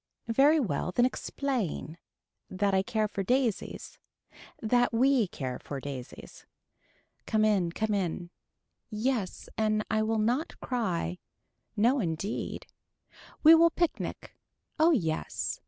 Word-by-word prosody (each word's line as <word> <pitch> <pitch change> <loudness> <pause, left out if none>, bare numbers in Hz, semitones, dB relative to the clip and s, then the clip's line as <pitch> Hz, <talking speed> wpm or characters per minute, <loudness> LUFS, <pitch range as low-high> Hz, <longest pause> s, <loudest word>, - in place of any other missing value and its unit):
Very 290 +6 +5
well 180 - -1
then 240 +6 +3
explain. 245 - -3 0.5
That 200 +1 0
I 190 - +4
care 220 0 0
for 200 - -4
daisies. 245 +1 -1 0.6
That 245 +2 +2
we 250 -1 +3
care 130 -6 -5
for 140 - -6
daisies. 130 -2 -9 0.8
Come 215 0 +2
in 195 -6 +2
come 215 +4 -1
in. 175 -3 -2 0.6
Yes 220 -2 -2
and 215 -1 +1
I 220 0 +2
will 220 +1 0
not 245 +9 -1
cry. 180 - -2 0.6
No 240 +6 +3
indeed. 175 +1 -3 0.8
We 315 +1 +10
will 335 +1 +7
picnic. 340 0 -3 0.4
Oh 320 +2 +6
yes. 165 - -1
215 Hz, 120 wpm, -29 LUFS, 185-250 Hz, 0.8 s, We